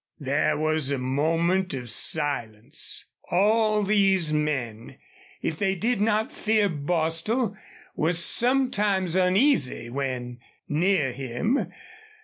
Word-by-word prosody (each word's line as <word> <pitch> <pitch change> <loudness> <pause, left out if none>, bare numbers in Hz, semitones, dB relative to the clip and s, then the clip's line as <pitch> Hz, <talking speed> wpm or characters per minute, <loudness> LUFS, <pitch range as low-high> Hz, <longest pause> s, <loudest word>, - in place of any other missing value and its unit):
There 145 +2 0
was 155 -2 0
a 140 - 0
moment 165 +7 0
of 125 -2 -6
silence. 120 +1 -1 0.2
All 215 +3 +2
these 195 -5 +2
men, 135 -8 -3 0.5
if 160 - -3
they 195 -1 +1
did 220 +3 -1
not 215 0 +1
fear 215 -1 +1
Bostil, 165 - -1 0.4
were 160 +3 +1
sometimes 205 -2 +2
uneasy 185 - +2
when 125 -2 -4 0.3
near 155 -2 +1
him. 135 - -2
165 Hz, 105 wpm, -25 LUFS, 140-205 Hz, 0.5 s, All